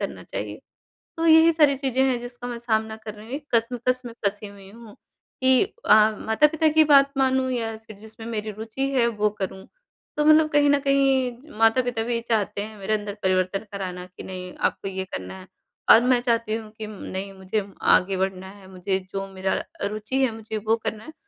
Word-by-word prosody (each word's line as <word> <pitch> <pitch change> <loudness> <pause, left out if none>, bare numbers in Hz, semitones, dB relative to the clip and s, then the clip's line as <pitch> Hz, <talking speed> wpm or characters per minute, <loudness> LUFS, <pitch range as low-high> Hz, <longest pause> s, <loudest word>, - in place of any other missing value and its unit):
करना - - -5
चाहिए। - - -6 0.6
तो 330 - 0
यही 320 +1 +7
सारी 295 -3 +4
चीज़ें 265 -1 0
हैं 260 -2 +2
जिसका 245 0 -8
मैं 240 - -5
सामना 220 -2 -1
कर 220 -1 -9
रही 210 0 -12
हूँ, 250 - -6
एक 295 0 -6
कश्मकश 245 +2 +1
में 235 - -7
फँसी 205 +1 -1
हुई 200 -1 -13
हूँ 225 0 -13 0.5
कि 260 -1 +5
अ, 440 - +2 0.2
माता-पिता 300 +8 +2
की 315 - +7
बात 275 0 +6
मानूँ? 260 -1 +2
या 225 -2 -2
फिर 220 -1 -14
जिसमें 220 +1 -11
मेरी 220 -2 -3
रुचि 225 +6 -4
है 250 -3 +2
वो 210 -2 0
करूँ? 190 0 -5 0.5
तो 300 - +1
मतलब 310 0 +6
कहीं 290 0 +4
न 285 - +4
कहीं 270 -2 +3
ज 305 - -17
माता-पिता 225 +1 +2
भी 235 0 -1
चाहते 210 -3 0
हैं 215 0 -8
मेरे 200 +2 -1
अंदर 205 -1 -3
परिवर्तन 185 +2 0
कराना 180 -2 -5
कि - - -8
नहीं 180 -1 -7 0.2
आपको - - -7
ये 190 0 -4
करना 90 0 -6
है 185 - -12 0.4
और 225 - +10
मैं 250 0 +3
चाहती 230 -3 0
हूँ 220 -1 -6
कि 215 - -5
नहीं 195 -1 -6
मुझे 195 +2 -3 0.3
आगे 190 +1 +4
बढ़ना 190 0 -2
है, 195 -1 -14
मुझे 190 +1 -2
जो 195 0 -3
मेरा 190 0 -1 0.3
रुचि 215 +5 -3
है 260 - +3
मुझे 220 0 -6
वो 225 - +3
करना 215 0 -4
है 315 - -10
225 Hz, 205 wpm, -24 LUFS, 200-260 Hz, 0.6 s, और